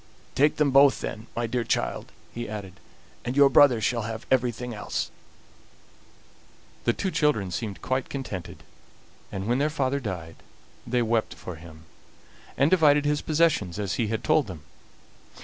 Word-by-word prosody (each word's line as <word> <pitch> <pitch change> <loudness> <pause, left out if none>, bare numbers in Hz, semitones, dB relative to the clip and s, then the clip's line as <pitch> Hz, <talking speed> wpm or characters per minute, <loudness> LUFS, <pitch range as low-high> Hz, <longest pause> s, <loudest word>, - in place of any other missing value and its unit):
Take 145 +3 +3
them 150 -2 +2
both, 140 +1 +5
then, 110 - -6
my 120 - -1
dear 120 +1 -1
child," - - -2 0.2
he 120 -2 -5
added, 100 -3 -7 0.4
"and 125 +3 -3
your 140 -1 +7
brother 130 -2 +6
shall 115 +2 0
have 110 +1 -5
everything 125 -1 0
else." 105 - -3 1.7
The 120 - +4
two 190 +7 -2
children 130 - +1
seemed 105 -1 -5
quite 130 0 -1
contented, 105 -10 -6 0.7
and 95 0 -4
when 120 +4 +1
their 150 +2 +2
father 140 -2 0
died 90 -9 -6 0.5
they 120 0 +1
wept 115 -1 0
for 90 -3 -8
him, 80 0 -13 0.7
and 140 +3 +3
divided 150 -5 +5
his 145 0 +1
possessions 150 - +1
as 100 -2 -2
he 110 - +1
had 110 +2 -3
told 140 +4 +3
them. 85 -6 -9
120 Hz, 155 wpm, -26 LUFS, 105-140 Hz, 1.7 s, your